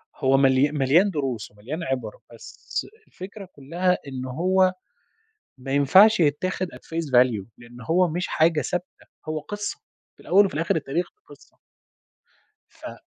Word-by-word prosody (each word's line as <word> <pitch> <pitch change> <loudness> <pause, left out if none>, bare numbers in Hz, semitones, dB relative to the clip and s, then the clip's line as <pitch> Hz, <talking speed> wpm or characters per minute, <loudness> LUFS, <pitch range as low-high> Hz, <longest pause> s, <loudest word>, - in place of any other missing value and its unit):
هو 135 0 +2
مليا 135 +1 +3
مليان 150 +7 +3
دروس 135 - -4
ومليان 125 +12 -7
عبَر، 125 -8 -3 0.2
بس 115 - -6 0.2
الفكرة 195 +2 -10
كلها 175 +6 0
إنه 130 -1 -6
هو 185 +5 +2 0.9
ما 135 +1 -6
ينفعش 185 +10 +6
يتاخد 175 +5 0
at - - -10
phase 165 -2 -5
value 120 -6 +3
لأن 120 +1 -14
هو 180 +2 +3
مش 175 +3 -2
حاجة 160 -1 +2
ثابتة، 180 +6 -3 0.4
هو 155 0 -2
قصّة، 205 +6 -6 0.4
في - - -21
الأوّل 200 +3 +4
وفي 190 - -7
الآخر 165 +2 0
التاريخ 160 +3 -2 0.2
قصّة. - - -18 1.1
ف - - -11
155 Hz, 140 wpm, -24 LUFS, 130-180 Hz, 1.1 s, ينفعش